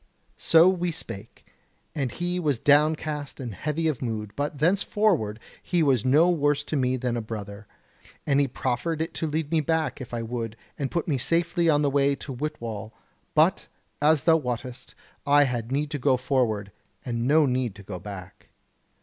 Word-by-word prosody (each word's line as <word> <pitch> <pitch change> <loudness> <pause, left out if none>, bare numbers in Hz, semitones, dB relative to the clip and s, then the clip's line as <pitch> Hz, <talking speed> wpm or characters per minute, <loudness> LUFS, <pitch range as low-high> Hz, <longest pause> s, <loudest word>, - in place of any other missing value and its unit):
"So 165 +2 +6
we 180 -2 +1
spake, 115 - -9 0.5
and 135 -5 -2
he 175 +4 -2
was 150 -7 +1
downcast 150 +1 +1
and 120 -5 -5
heavy 155 - -2
of 150 -6 -1
mood; 110 -4 -3
but 145 +1 -2
thenceforward 175 - +1 0.3
was 145 - +3
he 130 - 0
no 155 +6 +5
worse 145 -4 +2
to 155 - -4
me 130 -2 +1
than 125 -1 -2
a 120 - -1
brother. 105 -2 -7 0.6
And 140 -1 +3
he 140 - +3
proffered 135 +5 -2
it 160 - -2
to 160 - -2
lead 155 0 -2
me 160 -2 +3
back, 160 -1 -1
if 125 - -8
I 120 -1 -3
would, 115 -1 -4 0.2
and 140 -2 -3
put 170 - -2
me 140 -5 0
safely 170 +3 +1
on 150 -1 +3
the 145 - +3
way 140 0 +3
to 135 - -7
Whitwall; 115 -6 -5 0.4
but, - - +3 0.3
as 150 0 +4
thou 165 -1 +5
wottest, 125 -2 -5 0.3
I 145 +1 +6
had 120 -3 -2
need 145 +2 -1
to 145 - -3
go 130 0 +3
forward, 120 -6 0 0.3
and 120 -1 -2
no 150 +2 +5
need 125 -5 -1
to 100 - -12
go 95 -2 -7
back. 95 -1 -10
140 Hz, 185 wpm, -26 LUFS, 120-155 Hz, 0.6 s, So